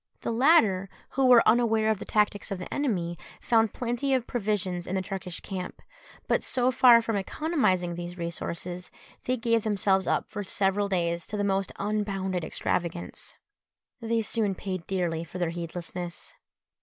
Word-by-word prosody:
The - - -2
latter, 225 - +4 0.2
who 270 -1 +2
were 245 -2 +7
unaware 220 -1 +4
of 215 - -1
the - - -6
tactics 210 -1 +1
of 195 - -3
the 180 - -7
enemy, 180 -12 -1 0.2
found 225 -3 +3
plenty 245 +3 0
of 250 -2 -1
provisions 195 -7 -1
in 185 - -2
the 190 - +1
Turkish 185 -2 -5
camp; 185 -2 -6 0.5
but - - +2
so 255 0 +1
far 245 -2 +7
from 225 -1 -1
economising 190 - 0
these 175 +1 -6
resources, 170 +1 -4 0.4
they 255 +1 +1
gave 230 -1 +1
themselves 195 -2 +2
up - - 0
for 205 - -4
several 200 +1 +1
days 170 -3 0
to 210 - -4
the 205 - 0
most 195 -1 0
unbounded 195 -3 -1
extravagance. 170 +1 -3 0.7
They 230 0 0
soon 210 -2 0
paid 185 -2 -5
dearly 175 -4 -1
for 170 +2 -9
their 175 -2 0
heedlessness. 175 +1 -5
195 Hz, 160 wpm, -27 LUFS, 180-225 Hz, 0.7 s, were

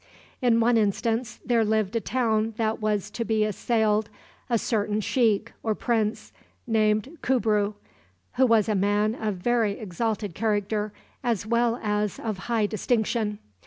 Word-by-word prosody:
In 240 -2 +4
one 230 +1 +4
instance 225 +2 0
there 235 -2 +3
lived 215 -1 0
in - - +3
a - - -15
town 225 -3 0
that 220 -1 -1
was 210 -1 -1
to 230 - -3
be 220 -1 +1
assailed 215 0 +1 0.4
a 235 - +3
certain 210 -2 0
sheikh, 220 -1 +1
or 220 -2 0
prince, 220 -2 -1 0.3
named 220 +6 +1
Kubru, 215 -5 +1 0.6
who 260 0 +4
was 225 -3 +4
a 215 - +1
man 205 +2 +2
of 215 -3 -2
very 225 +2 +1
exalted 210 0 -3
character, 210 +1 -1 0.3
as 230 -5 0
well 235 +1 +1
as 210 -1 0
of 215 -4 -4
high 225 -3 +2
distinction. 215 0 0
220 Hz, 150 wpm, -26 LUFS, 210-230 Hz, 0.6 s, In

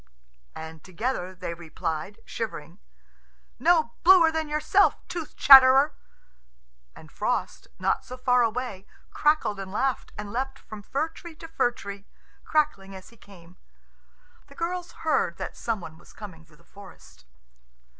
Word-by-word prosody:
And 160 0 -9
together 185 -1 -4
they 170 -2 -5
replied, 165 +4 -5
shivering, 180 -5 -6 0.8
"No 325 -7 +3
bluer 345 -2 +7
than 320 -1 -3
yourself, 305 +7 +3
tooth 335 -3 -6
chatterer." 270 +2 +8 1.0
And - - -15
Frost, - - -3
not - - 0
so 255 - -9
far 250 0 +3
away, 230 -4 -2 0.2
crackled 300 -9 +1
and 190 -1 -7
laughed, 260 +4 -1
and 205 -1 -6
leapt 270 +2 -3
from 215 -5 -11
fir 280 +10 -2
tree 330 0 -12
to 325 - -11
fir 320 -6 +1
tree, 200 -4 -10 0.4
crackling 245 -11 0
as 190 - -12
he 235 - -19
came. 180 -5 -17 0.9
The - - -17
girls 355 +1 -4
heard - - +1
that - - -6
some 225 -4 -3
one 160 -1 -11
was - - -18
coming 175 -7 -11
through 155 -1 -23
the - - -24
forest. 70 - -16
230 Hz, 145 wpm, -26 LUFS, 185-300 Hz, 1.0 s, chatterer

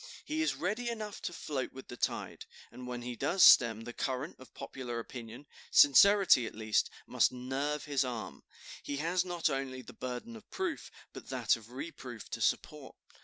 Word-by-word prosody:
He 315 +1 -1
is 320 - +1
ready 215 +7 -2
enough 215 -3 -5
to - - -3
float 145 -6 -4
with 130 - -10
the 120 - -8
tide, - - -3 0.2
and 125 0 -9
when 120 -1 -5
he 125 0 -5
does 180 +9 +2
stem 115 -3 +7
the 120 +1 -8
current 130 +5 -3
of 130 - -14
popular 130 -3 -6
opinion, 115 +2 -8 0.2
sincerity, 175 - +6
at - - -9
least, 110 0 +1 0.2
must - - +2
nerve 135 +4 -3
his 140 -2 +1
arm. 120 -4 -5 0.4
He 140 - -4
has 170 +4 +1
not 175 -2 -1
only 135 -3 -3
the - - -12
burden 130 - -6
of 220 - -14
proof, 360 -4 -3 0.2
but - - -10
that - - +2
of - - -13
reproof 335 +3 -8
to - - -4
support. - - -1
135 Hz, 180 wpm, -32 LUFS, 125-180 Hz, 0.4 s, stem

